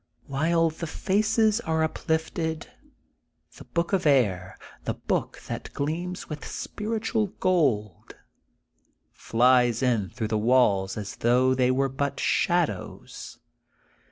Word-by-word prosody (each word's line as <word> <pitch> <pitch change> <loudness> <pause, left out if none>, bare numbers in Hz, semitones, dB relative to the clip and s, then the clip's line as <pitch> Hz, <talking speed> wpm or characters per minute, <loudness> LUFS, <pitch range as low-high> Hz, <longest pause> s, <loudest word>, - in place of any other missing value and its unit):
* - - -49
' - - -40
While 165 +4 +1
the 165 +1 -6
faces 215 +5 +1
are 160 -5 0
uplifted, 160 0 -2 0.9
the - - -12
book 170 +2 -2
of 185 -5 +2
air, 100 -10 +2 0.3
the - - -2
book - - -2
that - - -6
gleams 170 +5 -3
with 150 -1 -7
spiritual 220 0 -2
gold, 135 - 0 1.0
flies 125 +1 +3
in 115 -7 +1
through 110 -4 -4
the 110 -1 0
walls 105 -5 +2
as 105 -2 -6
though 125 +2 +3
they 130 -1 +2
were 135 +2 +2
but 135 +1 -3
shadows. - - -1
140 Hz, 125 wpm, -26 LUFS, 120-170 Hz, 1.0 s, flies